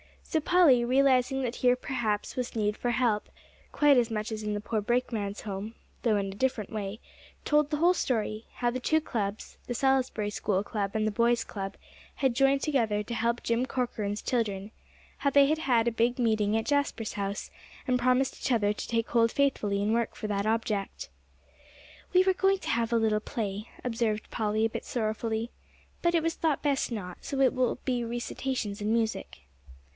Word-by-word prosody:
So 320 Hz, -, 0 dB
Polly, 310 Hz, -7 st, +5 dB
realizing 265 Hz, +1 st, +3 dB
that 245 Hz, -1 st, -3 dB
here 250 Hz, -1 st, +4 dB
perhaps 230 Hz, -5 st, -2 dB
was 250 Hz, -2 st, -3 dB
need 210 Hz, -1 st, 0 dB
for 245 Hz, -, -1 dB
help, 235 Hz, -4 st, +1 dB, 0.5 s
quite 290 Hz, -2 st, +5 dB
as 240 Hz, -1 st, +3 dB
much 215 Hz, 0 st, -3 dB
as 220 Hz, -1 st, -4 dB
in 210 Hz, 0 st, -2 dB
the 205 Hz, -, -3 dB
poor 215 Hz, 0 st, -1 dB
brakeman's 215 Hz, -3 st, -1 dB
home, 205 Hz, +2 st, -5 dB, 0.3 s
though 225 Hz, -3 st, +3 dB
in 200 Hz, -1 st, 0 dB
a 195 Hz, -, -6 dB
different 250 Hz, -3 st, -1 dB
way, 210 Hz, 0 st, -4 dB, 0.4 s
told 295 Hz, -1 st, +2 dB
the 300 Hz, -, -1 dB
whole 345 Hz, +4 st, +4 dB
story, 220 Hz, -8 st, -1 dB
how 240 Hz, -1 st, 0 dB
the 255 Hz, -, -3 dB
two 315 Hz, +5 st, +2 dB
clubs, 210 Hz, -7 st, -4 dB
the 245 Hz, -, -2 dB
Salisbury 260 Hz, -5 st, +1 dB
School 200 Hz, -2 st, 0 dB
Club 200 Hz, -2 st, -2 dB
and 215 Hz, 0 st, +1 dB
the 215 Hz, -, +1 dB
boys' 235 Hz, +2 st, +2 dB
club, 195 Hz, -3 st, -6 dB, 0.4 s
had 265 Hz, -3 st, +1 dB
joined 275 Hz, +2 st, +3 dB
together 225 Hz, -8 st, +1 dB
to 235 Hz, -, -6 dB
help 235 Hz, +1 st, 0 dB
Jim 235 Hz, +2 st, +1 dB
Corcoran's 215 Hz, -6 st, -2 dB
children; 210 Hz, -4 st, -1 dB, 0.5 s
how 280 Hz, -, +1 dB
they 280 Hz, 0 st, +6 dB
had 310 Hz, +2 st, +2 dB
had 240 Hz, -7 st, +2 dB
a -, -, +3 dB
big 235 Hz, +3 st, +1 dB
meeting 220 Hz, -3 st, +2 dB
at 225 Hz, -, -2 dB
Jasper's 285 Hz, -7 st, 0 dB
house, 200 Hz, 0 st, -4 dB, 0.3 s
and 250 Hz, -2 st, +1 dB
promised 255 Hz, +2 st, +1 dB
each -, -, -1 dB
other 205 Hz, -3 st, +2 dB
to 210 Hz, -, -5 dB
take 230 Hz, -1 st, -1 dB
hold 230 Hz, -1 st, +3 dB
faithfully 210 Hz, -8 st, +1 dB
and 215 Hz, +2 st, +1 dB
work 235 Hz, 0 st, 0 dB
for 215 Hz, -, -5 dB
that 200 Hz, 0 st, -1 dB
object. 220 Hz, -, -2 dB, 1.0 s
"We 365 Hz, 0 st, +6 dB
were 380 Hz, 0 st, +3 dB
going 385 Hz, +1 st, +2 dB
to -, -, -6 dB
have 230 Hz, 0 st, 0 dB
a -, -, +4 dB
little 220 Hz, -1 st, +2 dB
play," 215 Hz, -2 st, -4 dB, 0.2 s
observed 230 Hz, -3 st, -1 dB
Polly, 215 Hz, 0 st, 0 dB
a -, -, +1 dB
bit -, -, -6 dB
sorrowfully, 220 Hz, 0 st, -2 dB, 0.5 s
"but 345 Hz, 0 st, +2 dB
it 330 Hz, -, +2 dB
was 330 Hz, 0 st, 0 dB
thought 315 Hz, -4 st, 0 dB
best 280 Hz, -3 st, +1 dB
not, 180 Hz, -6 st, -5 dB
so 275 Hz, -, -4 dB
it 265 Hz, -, +4 dB
will 255 Hz, -2 st, +1 dB
be 245 Hz, -2 st, 0 dB
recitations 235 Hz, -2 st, -3 dB
and 210 Hz, +1 st, 0 dB
music." 220 Hz, -, -2 dB
230 Hz, 195 wpm, -29 LUFS, 210-260 Hz, 1.0 s, they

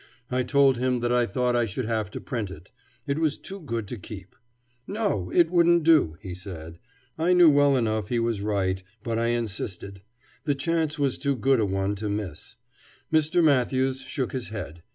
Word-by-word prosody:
I 130 Hz, 0 st, +1 dB
told 135 Hz, -1 st, +3 dB
him 125 Hz, 0 st, +1 dB
that 120 Hz, 0 st, 0 dB
I 120 Hz, -1 st, +3 dB
thought 125 Hz, +4 st, 0 dB
I 120 Hz, -1 st, +2 dB
should 110 Hz, +5 st, -4 dB
have 110 Hz, -3 st, -1 dB
to -, -, -6 dB
print 115 Hz, -8 st, -4 dB
it; 90 Hz, 0 st, -12 dB, 0.3 s
it 140 Hz, +1 st, -1 dB
was 155 Hz, -3 st, +1 dB
too 195 Hz, +1 st, -9 dB
good 115 Hz, -, -4 dB
to 120 Hz, -, -5 dB
keep. 95 Hz, -1 st, -10 dB, 0.5 s
No, 200 Hz, -, -1 dB
it 170 Hz, -1 st, +4 dB
wouldn't 170 Hz, -1 st, +4 dB
do, 150 Hz, -, +4 dB
he 95 Hz, -3 st, -6 dB
said. 85 Hz, -3 st, -9 dB, 0.4 s
I 175 Hz, +3 st, +3 dB
knew 175 Hz, -3 st, +7 dB
well 145 Hz, -1 st, +4 dB
enough 110 Hz, -4 st, 0 dB
he 120 Hz, -, 0 dB
was 115 Hz, -3 st, 0 dB
right, 95 Hz, -3 st, 0 dB, 0.2 s
but 115 Hz, -1 st, -1 dB
I 115 Hz, -, +1 dB
insisted; 100 Hz, -4 st, -3 dB, 0.4 s
the 145 Hz, -2 st, +1 dB
chance 160 Hz, +1 st, -1 dB
was 140 Hz, -3 st, 0 dB
too 140 Hz, -2 st, 0 dB
good 130 Hz, +1 st, +2 dB
a 105 Hz, -, +2 dB
one 95 Hz, +1 st, -1 dB
to 105 Hz, +1 st, -3 dB
miss. 100 Hz, -3 st, -5 dB, 0.6 s
Mr. 160 Hz, +3 st, +3 dB
Matthews 130 Hz, -2 st, +2 dB
shook 135 Hz, -1 st, -3 dB
his 130 Hz, -2 st, -4 dB
head. 90 Hz, -6 st, -7 dB
120 Hz, 195 wpm, -26 LUFS, 100-145 Hz, 0.6 s, knew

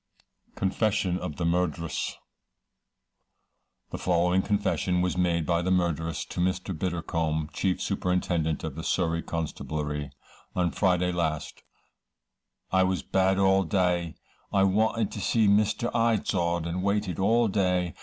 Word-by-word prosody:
Confession 95 Hz, -2 st, 0 dB
of 75 Hz, -, -5 dB
the 85 Hz, -, -2 dB
Murderess. 85 Hz, -3 st, -1 dB, 1.7 s
The -, -, -5 dB
following 90 Hz, +1 st, +2 dB
confession 95 Hz, -3 st, 0 dB
was 90 Hz, 0 st, 0 dB
made 85 Hz, -3 st, +1 dB
by 85 Hz, 0 st, +1 dB
the 90 Hz, -, -1 dB
murderess, 85 Hz, -3 st, 0 dB
to -, -, -7 dB
Mr. 95 Hz, +1 st, -1 dB
Biddlecombe, 80 Hz, -2 st, -2 dB
chief 95 Hz, -2 st, 0 dB
superintendent 90 Hz, -5 st, -1 dB
of 80 Hz, -3 st, -4 dB
the 80 Hz, +3 st, -7 dB
Surrey 85 Hz, -2 st, 0 dB
Constabulary: 75 Hz, -3 st, -4 dB, 0.5 s
"On 90 Hz, -1 st, +1 dB
Friday 90 Hz, -2 st, +2 dB
last, 80 Hz, -4 st, -2 dB, 1.1 s
I 95 Hz, -, +4 dB
was 95 Hz, -4 st, +1 dB
bad 95 Hz, 0 st, +2 dB
all 95 Hz, 0 st, +4 dB
day; 90 Hz, -2 st, 0 dB, 0.4 s
I 100 Hz, -1 st, +3 dB
wanted 110 Hz, +2 st, +2 dB
to 105 Hz, -, -5 dB
see 110 Hz, 0 st, +2 dB
Mr. 105 Hz, +3 st, +2 dB
Izod, 95 Hz, -7 st, +1 dB
and 85 Hz, +2 st, -2 dB
waited 100 Hz, -2 st, -1 dB
all 115 Hz, +4 st, +3 dB
day. 90 Hz, -4 st, +1 dB
90 Hz, 130 wpm, -27 LUFS, 85-95 Hz, 1.7 s, I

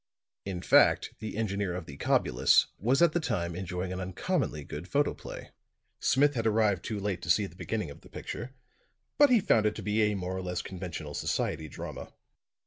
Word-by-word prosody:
In 95 Hz, -3 st, -4 dB
fact, -, -, +5 dB
the 110 Hz, -1 st, -5 dB
engineer 100 Hz, -4 st, -1 dB
of 90 Hz, -2 st, -5 dB
the 70 Hz, -, -9 dB
Cobulus 65 Hz, -1 st, +3 dB
was 130 Hz, -, +3 dB
at 170 Hz, -, +5 dB
the 175 Hz, -, +1 dB
time 90 Hz, -, -2 dB
enjoying 90 Hz, 0 st, -3 dB
an 90 Hz, -, -4 dB
uncommonly 95 Hz, -, -2 dB
good 75 Hz, +5 st, -7 dB
photoplay. 145 Hz, +5 st, -2 dB, 0.5 s
Smith 145 Hz, +2 st, +3 dB
had 115 Hz, -4 st, 0 dB
arrived 105 Hz, -4 st, +2 dB
too 105 Hz, -2 st, -3 dB
late 100 Hz, -3 st, -2 dB
to 85 Hz, -, -7 dB
see 100 Hz, +5 st, +4 dB
the 90 Hz, -, -11 dB
beginning 105 Hz, -4 st, -3 dB
of -, -, -13 dB
the -, -, -16 dB
picture; 125 Hz, +4 st, -7 dB, 0.6 s
but 290 Hz, -1 st, +8 dB
he 245 Hz, -3 st, +6 dB
found 110 Hz, -, +3 dB
it 105 Hz, -, -1 dB
to -, -, -6 dB
be 105 Hz, +1 st, +1 dB
a 105 Hz, -1 st, +2 dB
more 95 Hz, -1 st, -3 dB
or 95 Hz, -, -3 dB
less 90 Hz, -1 st, -3 dB
conventional 85 Hz, -5 st, -6 dB
society 80 Hz, +1 st, -1 dB
drama. -, -, -8 dB
100 Hz, 195 wpm, -29 LUFS, 90-110 Hz, 0.6 s, but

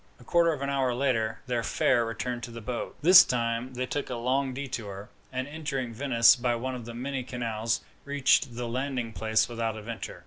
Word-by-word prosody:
A -, -, -15 dB
quarter 170 Hz, +5 st, +3 dB
of 145 Hz, -3 st, -4 dB
an 140 Hz, -, -1 dB
hour 130 Hz, -3 st, +1 dB
later, 115 Hz, -4 st, 0 dB
their 120 Hz, -2 st, -1 dB
fare 120 Hz, +1 st, +2 dB
returned 120 Hz, +2 st, -3 dB
to 120 Hz, -, -6 dB
the 115 Hz, 0 st, -8 dB
boat. 120 Hz, +2 st, -5 dB
This 180 Hz, +3 st, +10 dB
time 120 Hz, +1 st, -2 dB
they 130 Hz, +1 st, -1 dB
took 145 Hz, +2 st, -3 dB
a 125 Hz, -, -3 dB
long 130 Hz, +3 st, 0 dB
detour, 115 Hz, -7 st, -6 dB, 0.2 s
and, 130 Hz, 0 st, -3 dB
entering 145 Hz, -5 st, -4 dB
Venice 115 Hz, -2 st, +5 dB
by 120 Hz, -1 st, 0 dB
one 130 Hz, +3 st, -3 dB
of 125 Hz, -2 st, -7 dB
the 120 Hz, 0 st, -8 dB
many 130 Hz, +2 st, -3 dB
canals, 115 Hz, -2 st, -2 dB, 0.2 s
reached 140 Hz, -3 st, +2 dB
the 120 Hz, 0 st, -3 dB
landing 125 Hz, -1 st, -3 dB
place 110 Hz, 0 st, +1 dB
without 115 Hz, -2 st, -3 dB
adventure. 110 Hz, +1 st, -7 dB
125 Hz, 200 wpm, -28 LUFS, 115-135 Hz, 0.2 s, This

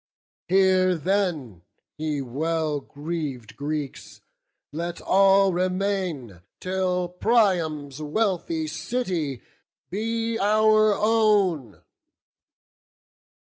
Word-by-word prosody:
Here 185 Hz, 0 st, +3 dB
then, 165 Hz, -, -1 dB, 0.3 s
ye 150 Hz, -2 st, -3 dB
well 155 Hz, +3 st, -1 dB
greav'd 145 Hz, -8 st, -6 dB
Greeks, 145 Hz, +1 st, -5 dB, 0.5 s
let 170 Hz, +3 st, -4 dB
all 195 Hz, 0 st, +4 dB
remain, 180 Hz, -, -2 dB, 0.2 s
Till 185 Hz, -1 st, -1 dB
Priam's 175 Hz, -, 0 dB
wealthy 165 Hz, -1 st, -1 dB
city 160 Hz, -, -3 dB, 0.5 s
be 225 Hz, +3 st, -2 dB
our 215 Hz, +1 st, +4 dB
own." 205 Hz, -, +1 dB
180 Hz, 70 wpm, -24 LUFS, 150-195 Hz, 0.5 s, all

